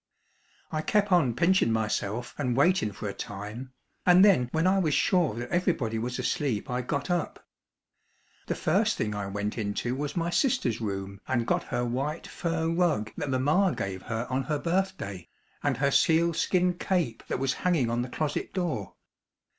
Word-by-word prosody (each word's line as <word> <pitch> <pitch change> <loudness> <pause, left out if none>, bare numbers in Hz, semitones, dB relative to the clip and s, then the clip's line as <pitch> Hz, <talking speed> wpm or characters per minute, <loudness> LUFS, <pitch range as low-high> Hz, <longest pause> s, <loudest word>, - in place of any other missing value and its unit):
I 155 - -1
kep' 205 +4 +1
on 155 -10 +4
pinchin' 175 -5 +3
myself 110 +1 -1
and 125 -4 0
waitin' 145 - +3
for 105 - -6
a 100 - -3
time, 105 +5 -7 0.3
and 180 +2 +7
then 150 -12 +4
when 160 +2 +1
I 190 +1 +4
was 155 -6 +1
sure 175 - +2
that 120 +1 -5
everybody 155 -11 0
was 125 +2 -3
asleep 135 - -1
I 125 0 0
got 140 +6 -2
up. 175 -3 -2 1.0
The - - -1
first - - +1
thing 105 -1 -1
I 100 -1 -3
went 105 +3 -3
into 110 +4 -2
was 145 +4 -4
my 170 0 0
sister's 175 - +1
room 100 -2 -4
and 120 -3 0
got - - 0
her 120 -1 -1
white 135 +7 -2
fur 165 -1 -2
rug 165 -10 +1
that 145 - -3
mamma 150 +9 +2
gave 95 -1 -4
her 115 +1 -3
on 130 +1 0
her 150 +3 0
birthday, 170 - -2 0.3
and 140 -4 0
her 140 +1 +2
sealskin 170 +3 +2
cape 165 -12 0
that - - -1
was 135 +1 0
hanging 160 -10 +2
on 120 +1 0
the 125 - -4
closet 155 +7 -3
door. 160 - -2
135 Hz, 175 wpm, -28 LUFS, 115-175 Hz, 1.0 s, and